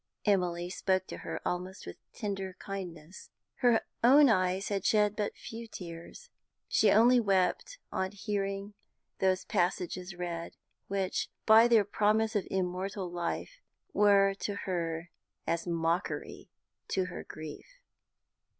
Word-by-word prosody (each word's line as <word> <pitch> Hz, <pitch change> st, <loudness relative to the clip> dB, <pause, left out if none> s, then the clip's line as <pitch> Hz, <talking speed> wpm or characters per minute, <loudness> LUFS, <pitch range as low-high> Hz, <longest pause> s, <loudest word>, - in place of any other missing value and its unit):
Emily 180 Hz, -4 st, +1 dB
spoke 185 Hz, 0 st, 0 dB
to -, -, -7 dB
her -, -, -5 dB
almost 180 Hz, +1 st, -3 dB
with 85 Hz, -, -8 dB
tender 195 Hz, -3 st, -4 dB
kindness. 180 Hz, -3 st, -8 dB, 0.3 s
Her 240 Hz, -3 st, +4 dB, 0.2 s
own 275 Hz, +3 st, +7 dB
eyes 185 Hz, -1 st, +1 dB
had 200 Hz, -2 st, -1 dB
shed 210 Hz, -1 st, +3 dB
but 210 Hz, -1 st, -2 dB
few 230 Hz, +1 st, -8 dB
tears; 175 Hz, -, -9 dB, 0.4 s
she 215 Hz, -, +4 dB
only 240 Hz, +3 st, +6 dB
wept 200 Hz, -, +1 dB
on 190 Hz, 0 st, -1 dB
hearing 200 Hz, 0 st, -3 dB, 0.5 s
those 190 Hz, -1 st, +2 dB
passages 180 Hz, -1 st, -1 dB
read 170 Hz, -1 st, -5 dB, 0.3 s
which, 195 Hz, -1 st, -1 dB, 0.2 s
by 225 Hz, +2 st, +8 dB
their 225 Hz, -4 st, +5 dB
promise 215 Hz, +2 st, +1 dB
of 205 Hz, -, 0 dB
immortal 185 Hz, 0 st, -2 dB
life, 175 Hz, -, -4 dB, 0.3 s
were 200 Hz, -1 st, +5 dB
to 205 Hz, -, -3 dB
her 170 Hz, -2 st, -3 dB, 0.3 s
as 170 Hz, +1 st, -1 dB
mockery 170 Hz, +2 st, -2 dB, 0.5 s
of 185 Hz, -1 st, +2 dB
her -, -, -7 dB
grief. 155 Hz, -, -10 dB
190 Hz, 125 wpm, -31 LUFS, 180-210 Hz, 0.5 s, by